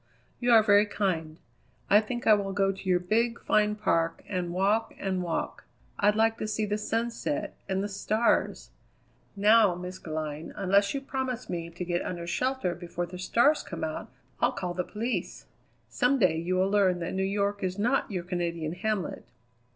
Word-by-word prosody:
You 245 - 0
are 220 -1 +8
very 205 0 +5
kind; 165 -7 -2 0.5
I 205 +2 +6
think 240 +2 -5
I 220 - +7
will 200 -2 0
go 195 0 +2
to 195 0 -7
your 180 -1 +4
big, 230 +6 0
fine 210 0 +2
park 165 -6 0
and 180 -3 -2
walk 200 +5 +1
and 190 -2 -2
walk. 170 -2 -3 0.3
I'd 205 +1 +4
like 225 +1 +2
to 215 - -2
see 215 0 -1
the 210 +1 -2
sun 230 +2 -1
set 295 +5 -3
and 190 0 0
the - - -1
stars 215 +3 0 0.3
" - - -37 0.3
"Now, 210 -1 +5
Miss 180 +1 -7
Glynn, 155 -1 -5
unless 200 +4 +2
you 275 - -2
promise 260 -3 -4
me 170 -1 -4
to 175 +1 -6
get 175 0 -1
under 170 -1 -4
shelter 230 +1 -1
before 175 0 -5
the 180 +1 -9
stars 240 +11 +3
come - - -7
out - - -4 0.3
I'll - - +2
call 180 -1 -3
the 180 0 -1
police. 230 +6 -4 0.4
Some 255 +3 +2
day 185 -9 +3
you 170 +3 -1
will 190 +1 +2
learn 195 -3 +3
that 170 - -3
New 190 - -1
York 200 +1 0
is 185 0 -2
not 240 +6 +1
your 185 -4 -3
Canadian 170 -3 -3
hamlet." 200 0 -3
195 Hz, 190 wpm, -28 LUFS, 180-215 Hz, 0.5 s, are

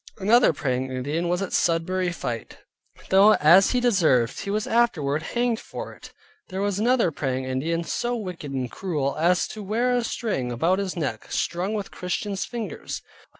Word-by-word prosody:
Another 220 +4 +5
Praying 130 -3 -2
Indian 145 +7 -2
was 180 +2 0
at 195 - -5
Sudbury 175 +2 +1
fight, 120 -8 -5 0.5
though, 200 +3 +7
as 170 +6 +6
he 250 - +2
deserved, 165 - +2
he - - -5
was 210 +1 0
afterward 160 -12 +1
hanged 240 +5 -1
for - - -7
it. - - -13 0.4
There 190 - -4
was 200 0 0
another 235 -5 +3
Praying 130 -3 -2
Indian, 155 +6 -1
so 240 +8 -2
wicked 180 -9 -6
and 130 -3 -3
cruel, 150 -8 -2
as 175 +2 +3
to 215 - -7
wear 235 +5 +1
a 245 - +1
string 205 - -2
about 165 +11 +1
his 190 -2 -3
neck, 135 -9 -4
strung 185 +5 -1
with 205 -2 -4
Christians' 190 +2 -3
fingers. 235 -3 -6
180 Hz, 170 wpm, -24 LUFS, 145-215 Hz, 0.5 s, though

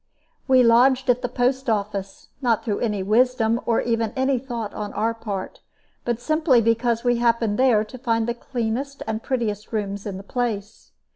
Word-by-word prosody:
We 260 -2 +6
lodged 250 +2 +5
at 245 0 -1
the 245 - -2
post 255 +1 0
office, 200 -2 -3
not 235 -4 +1
through 210 -3 -1
any 210 -5 -1
wisdom 230 +2 +2
or 230 - +2
even 230 -2 -1
any 265 0 +1
thought 235 -4 -5
on 210 -1 -5
our 225 +1 0
part, 205 -4 -6 0.4
but 240 -1 -1
simply 310 -1 +3
because 230 +1 +1
we 245 -1 +2
happened 230 -2 +1
there 245 -5 +4
to 230 +4 -11
find 230 -2 0
the 235 - 0
cleanest 245 +3 -4
and 220 0 -3
prettiest 220 -6 -3
rooms 200 -2 -3
in 195 -2 -5
the 195 - -9
place. 215 -2 -4
230 Hz, 180 wpm, -23 LUFS, 215-250 Hz, 0.4 s, We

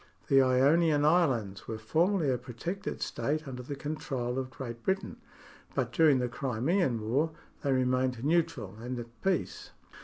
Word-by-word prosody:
The 135 0 +6
Ionian 145 +4 +4
Islands 130 - +2
were 110 - -4
formerly 160 - +1
a 125 - +1
protected 130 - -5
state 155 +1 -2
under 125 -2 -6
the 140 +3 -6
control 135 -4 -3
of 130 -1 -4
Great 120 -3 -7
Britain; 190 +5 -1 0.6
but - - 0
during 155 -5 +5
the 125 -1 0
Crimean 130 - 0
War 145 +8 +2 0.3
they 140 - 0
remained 130 -1 +1
neutral 160 - 0
and 125 +1 -4
at 115 -1 -9
peace. 190 -2 -1
135 Hz, 150 wpm, -30 LUFS, 125-160 Hz, 0.6 s, The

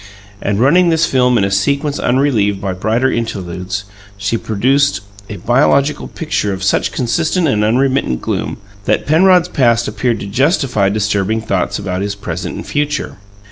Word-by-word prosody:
And 100 0 -1
running 170 +8 +4
this 165 0 +3
film 125 -3 +2
in 100 - +2
a 100 - 0
sequence 140 +9 0
unrelieved 120 -7 +1
by 95 -1 -3
brighter 110 +7 0
interludes, 95 -3 -4 0.3
she 100 +3 -1
produced 125 +1 +1 0.3
a 105 - -5
biographical 140 +7 +1
picture 155 -10 -2
of 95 0 -6
such 95 - +1
consistent 160 +7 0
and 105 -6 +1
unremittent 130 - +1
gloom - - -3 0.3
that - - +1
Penrod's 180 +3 +4
past 120 -6 +2
appeared 120 -3 -1
to - - -5
justify 125 - +1
disturbing 105 +1 0
thoughts 100 -4 -1
about 95 -2 -3
his 100 0 -3
present 90 -3 -5
and - - -7
future. 150 -3 -2
115 Hz, 155 wpm, -16 LUFS, 100-140 Hz, 0.3 s, running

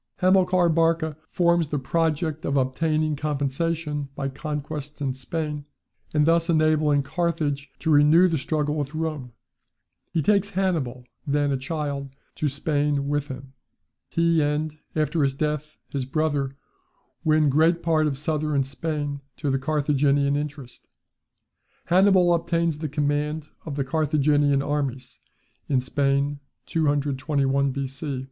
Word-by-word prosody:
Hamilcar 185 -1 +3
Barca 165 -1 +2
forms 170 -2 +2
the 150 - -2
project 155 +2 -1
of 140 - 0
obtaining 155 +4 +1
compensation 150 +1 -2
by 135 -1 -2
conquests 150 +1 -5
in 135 -3 -1
Spain, 150 +2 -4 0.5
and 150 -1 +3
thus 165 +1 +3
enabling 155 -3 +3
Carthage 150 -2 -1
to 160 - -1
renew 150 +5 +6
the 165 -4 0
struggle 150 +1 -1
with 150 0 -3
Rome. 155 -6 -3 0.8
He 165 -3 0
takes 200 +1 +3
Hannibal 140 -10 -1 0.2
(then 145 0 +1
a - - +2
child) 140 0 -4 0.2
to 150 - 0
Spain 145 0 0
with 145 0 0
him. 130 0 -9 0.6
He 170 -1 +2
and, 150 +1 -1 0.2
after 155 +1 +1
his 135 -1 +1
death, 150 +1 -2
his 135 -2 -3
brother, 140 -1 -1 0.7
win 155 -1 +3
great 165 +4 +3
part 155 -2 +2
of 140 -3 -2
southern 150 -1 0
Spain 145 +1 -3 0.2
to 140 +1 -1
the 135 - +1
Carthaginian 145 -1 +2
interest. 145 -4 -6 1.0
Hannibal 185 0 +5
obtains 170 -2 0
the 155 -1 -3
command 150 +1 -1 0.2
of 145 - -4
the 140 - 0
Carthaginian 145 -1 +2
armies 135 -4 -3 0.5
in 135 -3 +3
Spain, 140 +2 0 0.3
221 140 -2 +1
B.C. 135 +1 -4
150 Hz, 130 wpm, -25 LUFS, 140-160 Hz, 1.0 s, renew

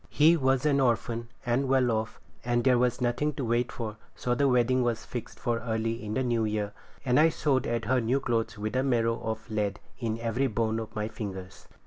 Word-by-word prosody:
He 160 +3 +5
was 135 -2 +1
an 140 -2 +3
orphan, 120 -2 0 0.2
and 125 +3 +1
well 130 -2 +3
off, 110 0 -2 0.2
and 120 0 +1
there 125 -2 +4
was 125 +1 +1
nothing 125 +5 0
to 135 -2 -3
wait 120 +1 +1
for, 110 -2 -5 0.2
so 125 - -1
the 140 +3 +2
wedding 125 0 +3
was 115 -2 -1
fixed 120 -3 -7
for 120 -1 0
early 115 0 -2
in 105 0 -4
the 130 - +1
new 120 -2 +1
year; 105 -1 -1 0.3
and 125 +1 +4
I 160 +1 +6
sewed 140 -5 0
at 115 -1 -1
her 125 +3 +2
new 120 +4 +1
clothes 115 -4 -1
with 105 +3 -3
a 130 - +3
marrow 115 -3 +1
of 110 +1 -4
lead 105 -2 -1 0.2
in 115 -3 -2
every 115 +4 0
bone 110 -1 0
of 110 - -7
my 105 0 -1
fingers. 95 -4 -7
120 Hz, 215 wpm, -28 LUFS, 110-130 Hz, 0.3 s, I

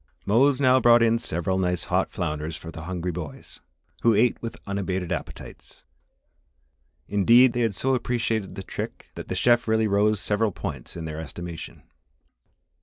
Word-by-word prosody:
Mose 130 +6 +3
now 130 -2 +5
brought 120 -1 +6
in 115 0 +3
several 95 0 -2
nice 90 -3 0
hot - - 0
flounders 75 +1 -3
for 80 +2 -9
the 80 -1 -9
hungry 90 0 -3
boys, 85 -3 -8 0.4
who 115 -2 +4
ate 115 +3 +2
with 115 - -6
unabated 95 -3 -3
appetites. - - -7 1.2
Indeed, 115 +5 +5
they 120 - -2
had 115 -4 0
so 135 +8 +1
appreciated 115 -6 -1
the 95 - -6
trick - - -7
that - - -8
the - - -3
chef 120 0 +3
really 110 0 +2
rose 105 +1 +2
several 105 +2 0
points - - -6
in 80 - -5
their 80 0 -5
estimation. 80 +2 -8
100 Hz, 160 wpm, -25 LUFS, 90-115 Hz, 1.2 s, brought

